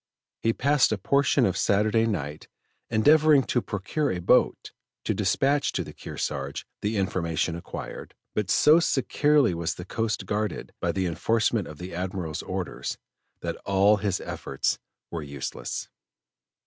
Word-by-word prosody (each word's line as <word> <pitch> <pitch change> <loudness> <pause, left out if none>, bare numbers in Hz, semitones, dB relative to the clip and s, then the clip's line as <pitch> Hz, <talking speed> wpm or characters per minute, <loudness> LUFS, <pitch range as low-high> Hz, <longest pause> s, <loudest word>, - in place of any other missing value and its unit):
He 115 - +3
passed 140 +3 +3
a 110 - +1
portion 140 +7 +3
of 95 - +1
Saturday 110 +4 +2
night 75 -8 -3 0.4
endeavoring 145 +5 +5
to 120 - 0
procure 115 +10 -2
a - - -2
boat 90 - +2 0.3
to - - 0
dispatch 140 +1 +1
to - - -1
the - - -10
Kearsarge 70 -1 -4 0.2
the 105 +1 -1
information 85 -3 0
acquired, 85 - -7 0.2
but 105 -3 -1
so 155 +9 +6
securely 145 - +3
was 85 -1 -2
the 90 - -8
coast 110 0 -2
guarded 105 -2 -3
by - - +1
the 95 -1 -1
enforcement 110 +4 +1
of 75 - -9
the 90 +2 -7
Admiral's 90 -3 -3
orders, - - -4 0.4
that - - -3
all 100 +2 +3
his 100 -2 -1
efforts 70 - -2 0.3
were 85 - -3
useless. 70 -2 -5
100 Hz, 145 wpm, -26 LUFS, 85-120 Hz, 0.4 s, so